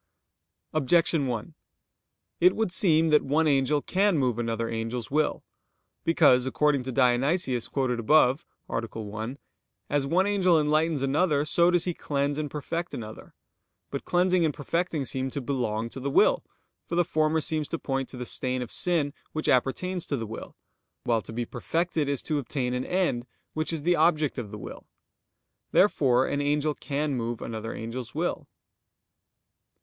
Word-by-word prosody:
Objection 155 Hz, 0 st, +2 dB
1: 120 Hz, +6 st, -4 dB, 0.9 s
It 180 Hz, +2 st, +5 dB
would 220 Hz, -5 st, 0 dB
seem 165 Hz, -4 st, +3 dB
that 150 Hz, -1 st, +5 dB
one 155 Hz, +4 st, +1 dB
angel 140 Hz, 0 st, +2 dB
can 195 Hz, -1 st, +2 dB
move 125 Hz, -4 st, 0 dB
another 115 Hz, -1 st, -1 dB
angel's 115 Hz, +1 st, -4 dB
will. 155 Hz, +1 st, 0 dB, 0.6 s
Because, 130 Hz, -6 st, +4 dB
according 145 Hz, +1 st, +2 dB
to 130 Hz, -, -3 dB
Dionysius 130 Hz, +1 st, +2 dB
quoted 130 Hz, -3 st, -1 dB
above 135 Hz, +3 st, +4 dB, 0.2 s
(A. -, -, -1 dB, 0.2 s
1), 110 Hz, +5 st, -5 dB, 0.5 s
as 145 Hz, -1 st, +1 dB
one 180 Hz, +6 st, +2 dB
angel 185 Hz, -5 st, +3 dB
enlightens 155 Hz, -1 st, +1 dB
another, 145 Hz, +1 st, +2 dB
so 170 Hz, +3 st, +3 dB
does 175 Hz, -1 st, +2 dB
he 175 Hz, -, -1 dB
cleanse 145 Hz, -1 st, -1 dB
and 150 Hz, -1 st, -3 dB
perfect 165 Hz, +4 st, -4 dB
another. 110 Hz, -2 st, -9 dB, 0.6 s
But -, -, -4 dB
cleansing 180 Hz, 0 st, +2 dB
and 160 Hz, -, +2 dB
perfecting 160 Hz, +1 st, -2 dB
seem 130 Hz, +1 st, -2 dB
to 140 Hz, -, -4 dB
belong 120 Hz, -5 st, -2 dB
to 135 Hz, -, -8 dB
the 140 Hz, +2 st, -2 dB
will: -, -, +4 dB, 0.4 s
for 170 Hz, -, -3 dB
the 175 Hz, 0 st, +3 dB
former 155 Hz, -1 st, +1 dB
seems 155 Hz, -2 st, -2 dB
to 165 Hz, -, -2 dB
point 135 Hz, -3 st, -3 dB
to 130 Hz, -, -9 dB
the 125 Hz, -, -5 dB
stain 130 Hz, +1 st, -1 dB
of 120 Hz, -, -9 dB
sin 160 Hz, -5 st, +2 dB, 0.2 s
which 155 Hz, -, -3 dB
appertains 175 Hz, +8 st, +1 dB
to 130 Hz, -6 st, -2 dB
will; 110 Hz, +1 st, -8 dB, 0.5 s
while 115 Hz, -2 st, +1 dB
to -, -, -10 dB
be 120 Hz, +1 st, -3 dB
perfected 160 Hz, +5 st, -1 dB
is 140 Hz, -2 st, -2 dB
to 150 Hz, -2 st, -1 dB
obtain 125 Hz, -1 st, -2 dB
an 125 Hz, 0 st, -2 dB
end, 175 Hz, -10 st, 0 dB, 0.3 s
which 155 Hz, +1 st, -1 dB
is 160 Hz, -3 st, -3 dB
the 175 Hz, +2 st, +3 dB
object 155 Hz, -5 st, +2 dB
of 110 Hz, -4 st, -6 dB
the 105 Hz, -, -7 dB
will. -, -, -9 dB, 0.8 s
Therefore 135 Hz, -10 st, +4 dB
an 145 Hz, -, -1 dB
angel 150 Hz, +1 st, +1 dB
can 145 Hz, 0 st, -2 dB
move 120 Hz, -2 st, -3 dB
another 115 Hz, 0 st, -5 dB
angel's 115 Hz, +2 st, -6 dB
will. -, -, -2 dB
145 Hz, 165 wpm, -27 LUFS, 125-160 Hz, 0.9 s, It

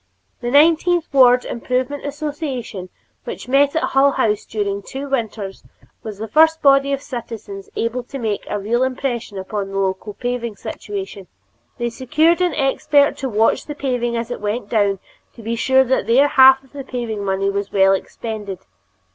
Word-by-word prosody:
The 240 Hz, -, -3 dB
Nineteenth 325 Hz, +4 st, +4 dB
Ward 250 Hz, -2 st, +5 dB
Improvement 255 Hz, +4 st, -2 dB
Association 285 Hz, -, -5 dB, 0.3 s
which -, -, -7 dB
met 280 Hz, +3 st, +3 dB
at 320 Hz, -, +1 dB
Hull 275 Hz, +1 st, +3 dB
House 210 Hz, -1 st, 0 dB
during 200 Hz, -2 st, -2 dB
two 270 Hz, +7 st, -7 dB
winters, 220 Hz, -7 st, -3 dB, 0.4 s
was 215 Hz, -3 st, -7 dB
the 220 Hz, +2 st, -5 dB
first 320 Hz, +7 st, +4 dB
body 275 Hz, 0 st, +5 dB
of 275 Hz, 0 st, -2 dB
citizens 275 Hz, -, -7 dB
able 235 Hz, +2 st, -1 dB
to 275 Hz, -, -7 dB
make 220 Hz, -5 st, -2 dB
a 210 Hz, -, -1 dB
real 220 Hz, +5 st, -1 dB
impression 255 Hz, -5 st, -2 dB
upon 195 Hz, +1 st, -4 dB
the 195 Hz, -, -5 dB
local 195 Hz, +1 st, -2 dB
paving 245 Hz, -2 st, -3 dB
situation. 195 Hz, -1 st, -7 dB, 0.5 s
They 240 Hz, -1 st, -2 dB
secured 305 Hz, +8 st, +2 dB
an 360 Hz, -1 st, +1 dB
expert 285 Hz, 0 st, +2 dB
to 270 Hz, -, -3 dB
watch 220 Hz, 0 st, +1 dB
the 295 Hz, -, -5 dB
paving 245 Hz, -4 st, -1 dB
as 230 Hz, +1 st, -4 dB
it 245 Hz, -, -5 dB
went 210 Hz, +1 st, -3 dB
down 205 Hz, -3 st, +2 dB, 0.4 s
to 230 Hz, -, -12 dB
be 230 Hz, +2 st, -2 dB
sure 260 Hz, +2 st, +4 dB
that 260 Hz, -5 st, 0 dB
their 270 Hz, +5 st, +4 dB
half 265 Hz, -1 st, +7 dB
of 265 Hz, -, -24 dB
the 280 Hz, -1 st, -6 dB
paving 235 Hz, -5 st, -4 dB
money 195 Hz, 0 st, 0 dB
was 200 Hz, 0 st, -3 dB
well 195 Hz, -1 st, +4 dB
expended. 205 Hz, 0 st, -5 dB
245 Hz, 170 wpm, -20 LUFS, 210-275 Hz, 0.5 s, half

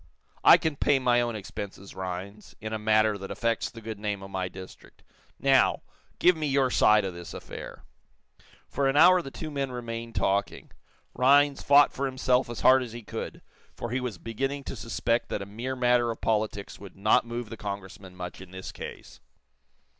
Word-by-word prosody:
"I -, -, +9 dB
can 155 Hz, -3 st, -2 dB
pay 145 Hz, 0 st, +3 dB
my 125 Hz, -2 st, +3 dB
own 120 Hz, -1 st, -2 dB
expenses, 100 Hz, -1 st, -7 dB
Rhinds, 95 Hz, +3 st, -7 dB
in 110 Hz, +1 st, -5 dB
a 110 Hz, -, -2 dB
matter 110 Hz, -1 st, +2 dB
that 95 Hz, -, -7 dB
affects 115 Hz, -1 st, -1 dB
the 115 Hz, -, -12 dB
good 110 Hz, -1 st, -6 dB
name 105 Hz, -2 st, -3 dB
of 95 Hz, -, -10 dB
my 95 Hz, -1 st, -2 dB
district. 95 Hz, 0 st, -13 dB, 0.3 s
Now, -, -, +3 dB, 0.3 s
give 180 Hz, 0 st, +5 dB
me 155 Hz, -2 st, -2 dB
your 135 Hz, -2 st, +2 dB
side 105 Hz, -1 st, +4 dB
of 95 Hz, -, -4 dB
this 85 Hz, 0 st, -9 dB
affair." -, -, -9 dB, 0.8 s
For 140 Hz, -, 0 dB
an 135 Hz, -, +1 dB
hour 180 Hz, +3 st, +7 dB
the 135 Hz, -, -8 dB
two 155 Hz, +3 st, -7 dB
men 140 Hz, -2 st, -2 dB
remained 115 Hz, -1 st, -6 dB
talking. 100 Hz, +1 st, -1 dB, 0.4 s
Rhinds 140 Hz, +2 st, +4 dB
fought 145 Hz, +1 st, +5 dB
for 140 Hz, +1 st, -1 dB
himself 130 Hz, -1 st, +1 dB
as 120 Hz, -, -6 dB
hard 130 Hz, 0 st, +6 dB
as 120 Hz, -3 st, -6 dB
he 120 Hz, -1 st, -8 dB
could, -, -, -7 dB, 0.3 s
for 120 Hz, -, -5 dB
he 130 Hz, -, 0 dB
was 125 Hz, -7 st, -4 dB
beginning 135 Hz, +8 st, -3 dB
to -, -, -6 dB
suspect 115 Hz, 0 st, -1 dB
that 100 Hz, -, -3 dB
a -, -, -8 dB
mere 120 Hz, +6 st, -5 dB
matter 125 Hz, -1 st, +3 dB
of 115 Hz, -, -4 dB
politics 105 Hz, -2 st, -2 dB
would 100 Hz, -1 st, -11 dB
not 105 Hz, +3 st, +3 dB
move 120 Hz, -1 st, -6 dB
the -, -, -5 dB
Congressman 100 Hz, -3 st, -7 dB
much 90 Hz, 0 st, -7 dB
in 95 Hz, -, -11 dB
this 95 Hz, 0 st, -8 dB
case. -, -, -9 dB
115 Hz, 190 wpm, -27 LUFS, 100-130 Hz, 0.8 s, I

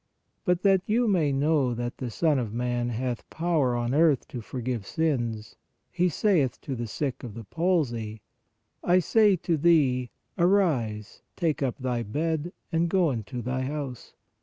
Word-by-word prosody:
But 180 Hz, -2 st, +1 dB
that 195 Hz, -2 st, +5 dB
you 235 Hz, +3 st, +2 dB
may 170 Hz, -8 st, +2 dB
know 140 Hz, -3 st, +2 dB
that 120 Hz, +1 st, -4 dB
the 125 Hz, -, -3 dB
Son 150 Hz, +4 st, +1 dB
of 115 Hz, -4 st, -3 dB
man 120 Hz, 0 st, -1 dB
hath 120 Hz, +1 st, -3 dB
power 160 Hz, -7 st, +1 dB
on 120 Hz, +1 st, -1 dB
earth 150 Hz, -3 st, +3 dB
to 120 Hz, -, -6 dB
forgive 120 Hz, -1 st, -4 dB
sins, 120 Hz, -9 st, -2 dB, 0.3 s
He 180 Hz, +1 st, +2 dB
saith 160 Hz, -, +1 dB
to 140 Hz, -, -5 dB
the 120 Hz, -1 st, -4 dB
sick 135 Hz, +4 st, -3 dB
of 115 Hz, -5 st, -7 dB
the 115 Hz, -, -7 dB
palsy: 120 Hz, -, -1 dB, 0.6 s
I 180 Hz, -, +4 dB
say 205 Hz, +2 st, +4 dB
to 170 Hz, -1 st, -1 dB
thee: 140 Hz, -6 st, +3 dB, 0.3 s
Arise, 150 Hz, -, +1 dB
take 160 Hz, -3 st, 0 dB
up 130 Hz, -3 st, -1 dB
thy 125 Hz, -3 st, -2 dB
bed 160 Hz, +8 st, -2 dB, 0.2 s
and 165 Hz, +1 st, +1 dB
go 175 Hz, -4 st, +3 dB
into 120 Hz, +1 st, -5 dB
thy 125 Hz, +1 st, -2 dB
house. 135 Hz, -2 st, -5 dB
135 Hz, 160 wpm, -27 LUFS, 120-170 Hz, 0.6 s, that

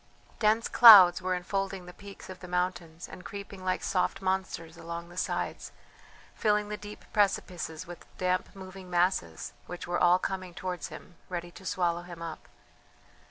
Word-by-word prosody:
Dense 220 Hz, +1 st, +3 dB
clouds 195 Hz, -7 st, +9 dB
were 185 Hz, 0 st, 0 dB
enfolding 195 Hz, +1 st, -3 dB
the 180 Hz, -, -11 dB
peaks 200 Hz, +1 st, -12 dB
of 185 Hz, -1 st, -9 dB
the 180 Hz, -, -10 dB
mountains 180 Hz, -2 st, -3 dB
and 180 Hz, -, -11 dB
creeping 200 Hz, -1 st, -8 dB
like 185 Hz, 0 st, -1 dB
soft 180 Hz, -, 0 dB
monsters 185 Hz, -3 st, -2 dB
along 170 Hz, 0 st, -7 dB
the 175 Hz, -, -13 dB
sides, 185 Hz, -, -3 dB, 0.6 s
filling 210 Hz, -1 st, +1 dB
the 210 Hz, -, -3 dB
deep 210 Hz, 0 st, -10 dB
precipices 185 Hz, -4 st, 0 dB
with 175 Hz, -1 st, -11 dB
damp 185 Hz, +1 st, -1 dB
moving 190 Hz, -1 st, -10 dB
masses 175 Hz, -, 0 dB
which 175 Hz, -, -7 dB
were 175 Hz, 0 st, -1 dB
all 175 Hz, 0 st, +5 dB
coming 185 Hz, -1 st, -4 dB
towards 185 Hz, -2 st, -4 dB
him 175 Hz, -, -12 dB
ready 175 Hz, -1 st, -5 dB
to 190 Hz, +1 st, -11 dB
swallow 175 Hz, -1 st, 0 dB
him 175 Hz, -1 st, -10 dB
up. 165 Hz, -2 st, -7 dB
180 Hz, 160 wpm, -29 LUFS, 175-195 Hz, 0.6 s, clouds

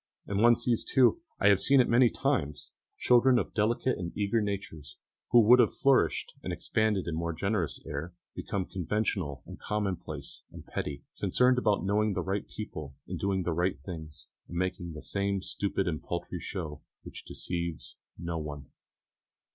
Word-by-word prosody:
And 100 Hz, +1 st, -1 dB
one 120 Hz, +1 st, +7 dB
sees 120 Hz, 0 st, 0 dB
too 135 Hz, -, +3 dB, 0.2 s
I 105 Hz, -, +5 dB
have 100 Hz, -1 st, +5 dB
seen 140 Hz, 0 st, +5 dB
it 125 Hz, -, +5 dB
many 120 Hz, +1 st, +5 dB
times 105 Hz, -, -1 dB, 0.3 s
children 125 Hz, +1 st, +5 dB
of -, -, -1 dB
delicate 115 Hz, +4 st, +1 dB
and 85 Hz, -2 st, -4 dB
eager 105 Hz, +2 st, +1 dB
natures, 100 Hz, -8 st, -5 dB, 0.3 s
who 120 Hz, -, +7 dB
would 120 Hz, +4 st, +7 dB
have -, -, +4 dB
flourished 135 Hz, -1 st, +2 dB
and -, -, -4 dB
expanded 110 Hz, -3 st, 0 dB
in 85 Hz, -, -2 dB
more 85 Hz, +1 st, -2 dB
generous 95 Hz, 0 st, -1 dB
air, 80 Hz, +5 st, -5 dB, 0.2 s
become 95 Hz, -2 st, -3 dB
conventional 90 Hz, -6 st, -2 dB
and -, -, -10 dB
commonplace 90 Hz, -8 st, -3 dB
and -, -, -11 dB
petty, 70 Hz, -1 st, -4 dB, 0.2 s
concerned 125 Hz, 0 st, +3 dB
about 105 Hz, -6 st, +1 dB
knowing 105 Hz, +1 st, +2 dB
the 90 Hz, -, -1 dB
right 95 Hz, +3 st, -2 dB
people 80 Hz, -9 st, -7 dB
and -, -, -4 dB
doing 95 Hz, -1 st, 0 dB
the 85 Hz, -, -1 dB
right 85 Hz, -2 st, 0 dB
things, 80 Hz, -3 st, -8 dB, 0.2 s
and 85 Hz, -, -6 dB
making 90 Hz, -2 st, -2 dB
the 75 Hz, -, -9 dB
same 100 Hz, -1 st, -1 dB
stupid 100 Hz, -1 st, -1 dB
and 80 Hz, -3 st, -2 dB
paltry 85 Hz, +1 st, -4 dB
show, 80 Hz, -5 st, -5 dB, 0.2 s
which -, -, -9 dB
deceives 85 Hz, -2 st, -4 dB, 0.2 s
no 85 Hz, -1 st, -3 dB
one. 75 Hz, -2 st, -7 dB
95 Hz, 170 wpm, -30 LUFS, 85-110 Hz, 0.3 s, one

